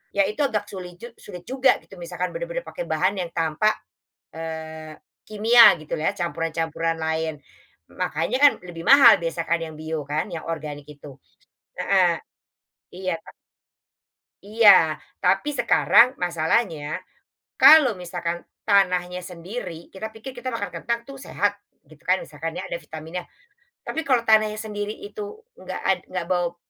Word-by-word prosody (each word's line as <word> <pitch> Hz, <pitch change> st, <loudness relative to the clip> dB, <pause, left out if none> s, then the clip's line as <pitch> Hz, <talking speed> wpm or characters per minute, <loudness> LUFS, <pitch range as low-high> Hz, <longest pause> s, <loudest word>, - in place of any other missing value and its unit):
Ya 200 Hz, -, +4 dB
itu 210 Hz, +6 st, -4 dB
agak 210 Hz, -4 st, -2 dB
suli 180 Hz, -2 st, -8 dB
jug 235 Hz, +7 st, -11 dB
sulit 180 Hz, -4 st, -10 dB
juga 260 Hz, +2 st, +2 dB
gitu -, -, -15 dB
misalkan -, -, -4 dB
benar-benar -, -, -4 dB
pakai -, -, -7 dB
bahan 190 Hz, +2 st, 0 dB
yang 175 Hz, -2 st, -4 dB
tanpa, 165 Hz, +6 st, +1 dB, 0.6 s
eee, 160 Hz, -1 st, -7 dB, 0.3 s
kimia 225 Hz, +3 st, +5 dB, 0.2 s
gitu 155 Hz, -, -5 dB
lah 155 Hz, -, 0 dB
ya -, -, -14 dB
campuran-campuran 165 Hz, 0 st, -2 dB
lain, 160 Hz, 0 st, -1 dB, 0.7 s
makanya -, -, -1 dB
kan 290 Hz, -, +9 dB, 0.2 s
lebih 170 Hz, -1 st, -8 dB
mahal 270 Hz, -3 st, +8 dB
biasanya 165 Hz, 0 st, -3 dB
kan 170 Hz, -, +3 dB
yang 160 Hz, -1 st, -9 dB
bio 155 Hz, -1 st, -4 dB
kan 155 Hz, +5 st, -1 dB
yang 160 Hz, -, -5 dB
organik 150 Hz, -2 st, -6 dB
itu, 145 Hz, -2 st, -12 dB, 0.6 s
heeh, -, -, +3 dB, 0.8 s
iya 185 Hz, -1 st, -2 dB
kan. -, -, -13 dB, 1.1 s
Iya 205 Hz, -7 st, +5 dB, 0.2 s
tapi 195 Hz, +11 st, +1 dB
sekarang 255 Hz, -2 st, +4 dB
masalahnya, 165 Hz, -3 st, -1 dB, 0.7 s
kalau 305 Hz, -6 st, +8 dB
misalkan 175 Hz, -2 st, -5 dB, 0.2 s
tanahnya 180 Hz, -3 st, +2 dB
sendiri 175 Hz, 0 st, -8 dB
kita 215 Hz, +3 st, -6 dB
pikir 220 Hz, +4 st, -10 dB
kita 255 Hz, +1 st, -5 dB
makan 230 Hz, -4 st, -4 dB
kentang 235 Hz, 0 st, -2 dB
itu 275 Hz, -, -10 dB
sehat, 205 Hz, 0 st, -2 dB, 0.2 s
gitukan 155 Hz, +5 st, -1 dB
misalkan 160 Hz, +4 st, -6 dB
ya 185 Hz, -, -5 dB
ada 170 Hz, -2 st, -5 dB
vitaminnya, 160 Hz, +3 st, -8 dB, 0.5 s
tapi 320 Hz, -3 st, -4 dB
kalau 250 Hz, -4 st, +3 dB
tanahnya 215 Hz, -1 st, +3 dB
sendiri 210 Hz, -1 st, -5 dB
itu 425 Hz, +1 st, -8 dB, 0.2 s
nggak -, -, -6 dB
ad 190 Hz, -2 st, +2 dB
nggak 185 Hz, -2 st, -4 dB
bau, 175 Hz, -1 st, 0 dB
180 Hz, 145 wpm, -23 LUFS, 165-225 Hz, 1.1 s, kan